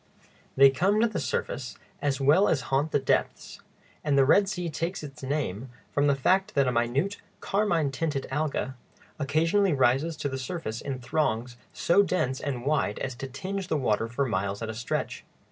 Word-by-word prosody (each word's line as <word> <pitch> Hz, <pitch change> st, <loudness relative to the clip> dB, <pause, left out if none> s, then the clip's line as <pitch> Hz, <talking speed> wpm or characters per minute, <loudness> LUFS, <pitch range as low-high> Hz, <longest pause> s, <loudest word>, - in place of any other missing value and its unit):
They 135 Hz, 0 st, +7 dB
come 195 Hz, +10 st, +2 dB
to 235 Hz, -, +4 dB
the 220 Hz, -, -3 dB
surface 130 Hz, -1 st, -3 dB, 0.2 s
as 140 Hz, -2 st, 0 dB
well 150 Hz, +9 st, +5 dB
as 140 Hz, -, +2 dB
haunt 140 Hz, +4 st, +2 dB
the -, -, +3 dB
depths; 135 Hz, -, -1 dB, 0.4 s
and 145 Hz, -2 st, +2 dB
the 135 Hz, -, +6 dB
Red 195 Hz, +7 st, +4 dB
Sea 180 Hz, -3 st, -3 dB
takes 165 Hz, +2 st, -3 dB
its 145 Hz, 0 st, -9 dB
name 130 Hz, -5 st, -3 dB, 0.2 s
from 145 Hz, 0 st, +2 dB
the 140 Hz, -, +4 dB
fact 185 Hz, +8 st, +1 dB
that 140 Hz, -2 st, +3 dB
a -, -, +2 dB
minute 125 Hz, +11 st, 0 dB, 0.2 s
carmine 175 Hz, -8 st, +1 dB
tinted 140 Hz, 0 st, -2 dB
alga 145 Hz, -2 st, -1 dB, 0.5 s
occasionally 165 Hz, +7 st, +2 dB
rises 135 Hz, +4 st, +2 dB
to 145 Hz, -, -2 dB
the 135 Hz, -1 st, -4 dB
surface 125 Hz, -5 st, -4 dB
in 135 Hz, -2 st, -4 dB
throngs 125 Hz, -3 st, -1 dB, 0.2 s
so 185 Hz, +4 st, +3 dB
dense 160 Hz, -9 st, 0 dB
and 130 Hz, -4 st, -3 dB
wide 140 Hz, -8 st, +1 dB
as 130 Hz, -, -3 dB
to 135 Hz, +3 st, -6 dB
tinge 190 Hz, +8 st, -5 dB
the 155 Hz, -, 0 dB
water 115 Hz, -4 st, +1 dB
for 120 Hz, +4 st, -1 dB
miles 100 Hz, -2 st, -2 dB
at 110 Hz, -, -3 dB
a -, -, -7 dB
stretch. 115 Hz, +2 st, -3 dB
140 Hz, 185 wpm, -27 LUFS, 130-165 Hz, 0.5 s, They